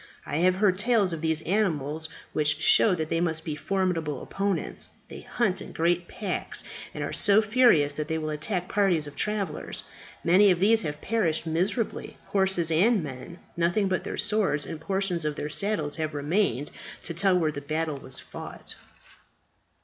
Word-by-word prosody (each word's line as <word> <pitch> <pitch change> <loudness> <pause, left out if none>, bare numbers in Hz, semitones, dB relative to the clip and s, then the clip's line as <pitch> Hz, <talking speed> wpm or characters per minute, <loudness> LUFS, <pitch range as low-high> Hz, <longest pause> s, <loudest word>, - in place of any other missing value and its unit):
"I 145 - -2
have 180 +2 +3
heard 190 -1 +2
tales 210 -5 +2
of 160 - -5
these 160 -1 0
animals 160 -6 0 0.2
which 150 0 +2
show 185 +4 +5
that 160 -2 -3
they 165 - +1
must 160 -2 -1
be 155 - -3
formidable 165 -3 -1
opponents. 195 -3 -2 0.2
They - - -9
hunt 195 -6 -1
in - - -9
great 175 +1 +1
packs, 200 -4 -2 0.3
and - - -5
are - - -4
so 205 -1 +4
furious 215 - +4
that 150 -1 -2
they 160 0 -1
will 155 -1 -3
attack 180 +4 -2
parties 190 -7 +2
of 145 - -9
travellers; 200 -7 -2 0.4
many 190 +4 +6
of 180 -2 +3
these 220 +4 +4
have 150 -3 -4
perished 185 -9 0
miserably, 185 +8 -1
horses 190 -4 +1
and 195 +4 +3
men, 135 -4 -6
and 170 - -11 0.2
nothing 175 +4 +1
but 185 -1 -1
their - - -5
swords 200 -9 +1
and 160 -2 -7
portions 190 -2 -1
of 150 -1 -1
their 150 - -4
saddles 185 -5 -1
have 155 -1 -3
remained 145 - 0 0.3
to 170 - -3
tell 185 +2 +3
where 160 -3 +1
the 145 -1 -6
battle 155 +1 -2
was 130 -1 -7
fought." - - -9
170 Hz, 180 wpm, -27 LUFS, 155-195 Hz, 0.4 s, many